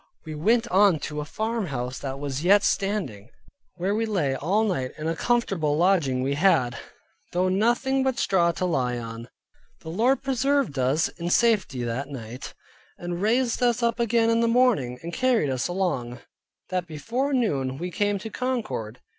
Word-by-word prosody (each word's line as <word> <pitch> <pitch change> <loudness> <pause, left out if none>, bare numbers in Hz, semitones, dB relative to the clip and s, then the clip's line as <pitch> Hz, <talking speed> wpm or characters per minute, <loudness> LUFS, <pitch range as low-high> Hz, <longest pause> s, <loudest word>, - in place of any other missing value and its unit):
We 155 - -6
went 225 +10 +2
on 195 -3 +5
to 150 0 -4
a - - -5
farmhouse 155 - -3
that 135 -1 -5
was 140 +1 -4
yet 200 +3 +5
standing, 180 - -1 0.5
where 185 +3 -1
we 225 +1 0
lay 160 -11 0
all 185 - +1
night, 170 -12 -1
and 155 +1 -4
a 165 - -1
comfortable 180 -9 0
lodging 160 -8 +2
we 135 +2 0
had, 140 -6 +2 0.6
though 180 +1 +2
nothing 240 +7 +1
but 265 -1 0
straw 175 -3 +2
to 185 - -2
lie 125 -8 0
on. 115 0 -7 0.5
The 160 - -8
Lord 235 +10 +1
preserved 270 - 0
us 135 +5 +2
in 170 0 -6
safety 195 - +2
that 120 +4 -3
night, 125 -2 -8 0.4
and 175 0 -5
raised 235 +4 +1
us 240 -1 +2
up 235 0 +1
again 230 0 +2
in 230 - +2
the 230 - +2
morning, 230 - +2
and 170 +1 -6
carried 250 - +2
us 130 0 -1
along, 150 -10 -2 0.5
that 180 -1 -1
before 230 - -2
noon, 140 - 0
we 175 +4 -4
came 205 +1 0
to 215 +3 -7
Concord. 210 - -3
180 Hz, 170 wpm, -25 LUFS, 135-230 Hz, 0.6 s, on